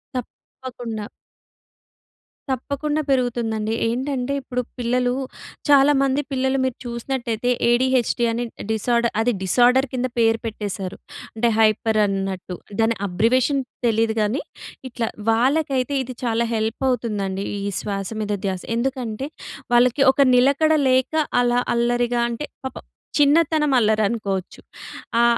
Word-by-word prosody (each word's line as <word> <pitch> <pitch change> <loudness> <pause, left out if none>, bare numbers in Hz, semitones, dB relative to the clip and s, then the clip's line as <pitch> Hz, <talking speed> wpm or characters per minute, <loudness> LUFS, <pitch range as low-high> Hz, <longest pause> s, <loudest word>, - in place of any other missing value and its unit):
తప్పకుండా. 240 -3 -7 1.4
తప్పకుండా 285 +4 -2
పెరుగుతుందండి. 230 -4 0
ఏంటంటే 260 +2 -2
ఇప్పుడు 250 -1 -3 0.2
పిల్లలు, 245 +1 +1 0.6
చాలామంది 275 0 +4
పిల్లలు 265 0 +1
మీరు 260 -2 -2
చూసినట్లయితే 240 -1 -2 0.2
ఏడిహెచ్‍డి 245 -1 +2
అని 235 +1 -2 0.3
డిసార్డర్, 235 +2 +1
అది 245 +2 +2
డిసార్డర్ 250 +7 +4
కింద 255 0 0
పేరు 225 0 +3
పెట్టేసారు. 200 -3 -4 0.4
అంటే 235 +1 +2
హైపర్ 220 0 +3
అన్నట్టు. 195 -2 -3 0.3
దాని 225 0 +2
అబ్రివియేషన్ 250 +9 +2 0.3
తెలీదు 225 0 +2
కానీ, 215 +7 0 0.5
ఇట్లా 230 -1 -2 0.2
వాళ్ళకైతే 265 +2 +1
ఇది 255 0 -8
చాలా 235 0 +1
హెల్ప్ 220 +3 -2
అవుతుందండి, 205 -5 -2 0.2
ఈ - - -1
శ్వాస 195 -2 -3
మీద 210 0 -2
ధ్యాస. 185 -2 -2
ఎందుకంటే, 250 0 -2 0.5
వాళ్ళకి 245 +3 +4
ఒక 280 - +1
నిలకడ 280 +5 +4 0.2
లేక 260 +4 +2 0.3
అలా 245 0 +2 0.2
అల్లరిగా 240 0 +1
అంటే, 235 +5 -4 0.2
పాపం 260 - -6 0.3
చిన్నతనం 300 0 +3
అల్లరి 220 -2 +3
అనుకోవచ్చు. 195 -5 -3 0.6
ఆ - - +5
240 Hz, 115 wpm, -22 LUFS, 220-260 Hz, 1.4 s, ఆ